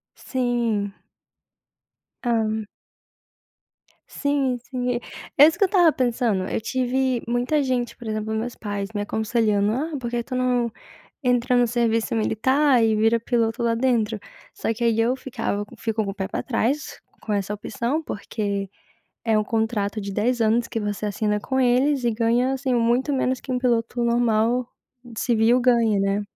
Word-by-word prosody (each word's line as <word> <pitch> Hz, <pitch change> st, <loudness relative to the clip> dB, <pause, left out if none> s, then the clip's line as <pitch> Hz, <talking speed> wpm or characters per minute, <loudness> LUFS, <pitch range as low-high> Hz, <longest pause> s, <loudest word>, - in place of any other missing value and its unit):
Sim! 235 Hz, -6 st, -1 dB, 1.3 s
Hã. 220 Hz, -2 st, 0 dB, 1.4 s
Sim, 280 Hz, -3 st, 0 dB
sim! 250 Hz, -2 st, -1 dB, 0.4 s
É 290 Hz, -, +10 dB
isso 325 Hz, +1 st, 0 dB
que -, -, +2 dB
eu -, -, -3 dB
tava 350 Hz, -5 st, +5 dB
pensando, 230 Hz, -7 st, 0 dB
eu -, -, -2 dB
tive 255 Hz, +1 st, 0 dB
muita 245 Hz, +5 st, +1 dB
gente, 250 Hz, -3 st, -1 dB
por 235 Hz, -2 st, -9 dB
exemplo, 215 Hz, 0 st, -2 dB
meus 230 Hz, +2 st, -3 dB
pais 205 Hz, -2 st, -4 dB
me 205 Hz, -, -2 dB
aconselhando: 215 Hz, -1 st, +1 dB
"Ah, 295 Hz, +3 st, -2 dB
por 240 Hz, -2 st, -4 dB
que 240 Hz, -1 st, -2 dB
tu 255 Hz, -, -8 dB
não 250 Hz, -2 st, +1 dB, 0.5 s
entra 250 Hz, 0 st, +2 dB
no 245 Hz, 0 st, +4 dB
serviço 230 Hz, -1 st, 0 dB
militar 260 Hz, +4 st, +3 dB
e 220 Hz, -1 st, +3 dB
vira 225 Hz, +2 st, +3 dB
piloto 230 Hz, 0 st, 0 dB
lá 230 Hz, -1 st, +2 dB
dentro?" 230 Hz, -3 st, +1 dB, 0.3 s
Só 225 Hz, -, -2 dB
que 235 Hz, +2 st, -4 dB
aí 225 Hz, -1 st, +2 dB
eu 240 Hz, +3 st, +2 dB
ficava 240 Hz, -6 st, -3 dB
fico 225 Hz, -1 st, -1 dB
com 195 Hz, -, -3 dB
o -, -, -8 dB
pé 190 Hz, -1 st, -3 dB
pra -, -, -4 dB
trás 265 Hz, +4 st, -1 dB, 0.2 s
com 215 Hz, -, -5 dB
essa 200 Hz, 0 st, -1 dB
opção, 235 Hz, +8 st, -2 dB
porque 200 Hz, -4 st, -3 dB, 0.6 s
é 220 Hz, -2 st, +3 dB
um 215 Hz, -, 0 dB
contrato 220 Hz, -2 st, -1 dB
de 200 Hz, -1 st, -5 dB
10 235 Hz, +4 st, 0 dB
anos 230 Hz, +2 st, +2 dB
que 225 Hz, -, -3 dB
você 210 Hz, 0 st, -3 dB
assina 210 Hz, +1 st, 0 dB
com 265 Hz, +4 st, -2 dB
eles 255 Hz, +2 st, +2 dB
e 235 Hz, -, +3 dB
ganha 235 Hz, +3 st, +1 dB
assim 265 Hz, -1 st, -1 dB
muito 240 Hz, +5 st, +2 dB
menos 260 Hz, -1 st, 0 dB
que -, -, -9 dB
um 250 Hz, -, +1 dB
piloto 240 Hz, -1 st, 0 dB
normal, 235 Hz, +1 st, +2 dB, 0.5 s
civil, 235 Hz, +1 st, +3 dB
ganha, 235 Hz, -4 st, +3 dB
né? 195 Hz, +1 st, +1 dB
235 Hz, 165 wpm, -23 LUFS, 220-250 Hz, 1.4 s, É